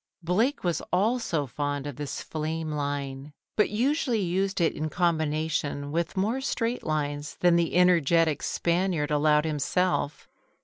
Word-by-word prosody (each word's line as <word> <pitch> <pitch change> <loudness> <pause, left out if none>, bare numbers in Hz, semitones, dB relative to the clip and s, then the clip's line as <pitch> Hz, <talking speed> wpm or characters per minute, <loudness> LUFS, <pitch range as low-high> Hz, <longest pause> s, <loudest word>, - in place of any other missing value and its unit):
Blake 220 - +1
was 175 -2 0
also 195 - +1
fond 145 +1 -3
of 145 -3 -5
this 145 +1 -5
flame 160 0 -3
line, 140 -1 -4 0.2
but 210 - +3
usually 245 +2 +1
used 190 +1 0
it 170 - +2
in 155 +1 -3
combination 155 -4 -1
with 170 +4 -2
more 220 +8 0
straight 240 -2 -1
lines 145 -1 -2
than 175 -1 +5
the 170 -1 +1
energetic 165 -3 +4
Spaniard 170 -3 0
allowed 150 +1 +3
himself. 155 +1 0
165 Hz, 135 wpm, -27 LUFS, 145-185 Hz, 0.2 s, than